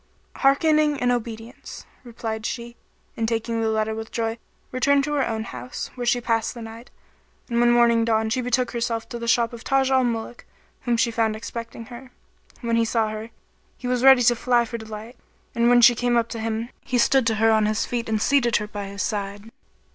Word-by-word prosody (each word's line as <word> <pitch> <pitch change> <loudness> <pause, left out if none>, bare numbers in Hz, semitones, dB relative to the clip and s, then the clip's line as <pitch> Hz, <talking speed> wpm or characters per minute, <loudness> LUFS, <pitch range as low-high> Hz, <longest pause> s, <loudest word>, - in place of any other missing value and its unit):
" - - -39
"Hearkening 300 +1 +3
and 245 0 +2
obedience," 230 0 -6 0.2
replied 225 -2 -5
she, 235 0 -5 0.4
and 225 - -1
taking 230 0 -1
the 225 - +1
letter 220 0 0
with 220 0 -7
joy, 225 0 -2 0.3
returned 275 +2 +2
to 295 +1 -2
her 280 -2 +1
own 220 -1 -2
house, 250 +2 -7
where 245 -1 -5
she 245 +1 +3
passed 230 0 -1
the 235 - -8
night; 225 +2 -10 0.6
and 235 -1 -1
when 240 0 +4
morning 235 -1 +4
dawned 220 -1 +1
she 255 - -1
betook 250 0 0
herself 230 -1 -2
to 235 - -6
the 235 - -5
shop 230 +1 +2
of 235 - -9
Taj 270 0 +1
al 260 -1 +4
Muluk 235 0 -3 0.4
whom 240 -1 +1
she 235 +1 +2
found 225 -1 0
expecting 230 +1 -7
her. 245 +2 -11 0.5
When 230 -1 0
he 230 - +3
saw 225 -1 0
her, 215 +1 -6 0.5
he - - -11
was 250 0 0
ready 265 -2 +7
to 240 - +5
fly[FN#35] 240 0 +1
for 235 - -4
delight, 220 +2 -9 0.4
and 235 0 +2
when 245 0 +6
she 240 +1 +8
came 240 0 +1
up 230 0 +1
to 230 - -5
him, 225 +1 -3
he 250 - -1
stood 250 +1 +3
to 225 - +2
her 225 +1 +3
on 215 -1 +3
his 215 +1 0
feet 235 -2 -3
and 220 -1 +1
seated 240 -1 +2
her 210 - +1
by 205 -1 -6
his 200 +1 -4
side. 205 +1 -4
235 Hz, 215 wpm, -23 LUFS, 225-245 Hz, 0.6 s, she